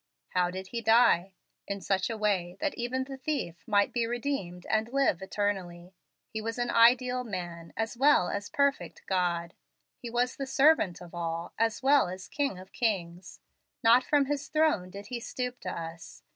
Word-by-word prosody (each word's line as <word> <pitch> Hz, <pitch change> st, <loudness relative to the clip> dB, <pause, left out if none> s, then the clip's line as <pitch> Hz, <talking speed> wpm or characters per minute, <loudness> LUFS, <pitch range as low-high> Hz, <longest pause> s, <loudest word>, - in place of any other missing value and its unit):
How 180 Hz, -1 st, +1 dB
did 190 Hz, +1 st, -7 dB
He 235 Hz, +2 st, -3 dB
die? 225 Hz, -5 st, +4 dB, 0.3 s
In 200 Hz, 0 st, -3 dB
such 190 Hz, +1 st, 0 dB
a 225 Hz, -, -3 dB
way 190 Hz, -4 st, 0 dB
that 295 Hz, -, -1 dB
even 250 Hz, +2 st, -2 dB
the 270 Hz, 0 st, -8 dB
thief 260 Hz, -, -3 dB
might 205 Hz, -2 st, +2 dB
be 235 Hz, -2 st, 0 dB
redeemed 235 Hz, -8 st, -3 dB
and 220 Hz, +2 st, 0 dB
live 270 Hz, -10 st, +2 dB
eternally. 190 Hz, -3 st, -3 dB, 0.3 s
He 220 Hz, -, -5 dB
was 225 Hz, +2 st, -4 dB
an 240 Hz, 0 st, -1 dB
ideal 250 Hz, +2 st, +4 dB
man, 175 Hz, -6 st, -6 dB
as 225 Hz, +2 st, -2 dB
well 270 Hz, -7 st, +4 dB
as 200 Hz, +2 st, -4 dB
perfect 280 Hz, 0 st, 0 dB
God. 175 Hz, -3 st, 0 dB, 0.5 s
He 240 Hz, -, -6 dB
was 245 Hz, +2 st, 0 dB
the 275 Hz, -, -4 dB
servant 270 Hz, -, +3 dB
of 175 Hz, -1 st, -11 dB
all, 170 Hz, 0 st, -4 dB
as 225 Hz, +2 st, 0 dB
well 275 Hz, -4 st, +5 dB
as 185 Hz, +1 st, -7 dB
King 280 Hz, -9 st, -1 dB
of 185 Hz, +1 st, -12 dB
kings. 185 Hz, -6 st, -2 dB, 0.4 s
Not 235 Hz, +3 st, +6 dB
from 290 Hz, -1 st, +3 dB
his 285 Hz, +1 st, -2 dB
throne 305 Hz, -13 st, +1 dB
did 200 Hz, +2 st, -10 dB
He 240 Hz, -, -1 dB
stoop 250 Hz, +1 st, -4 dB
to -, -, -5 dB
us. 165 Hz, 0 st, -8 dB
220 Hz, 180 wpm, -29 LUFS, 180-250 Hz, 0.5 s, Not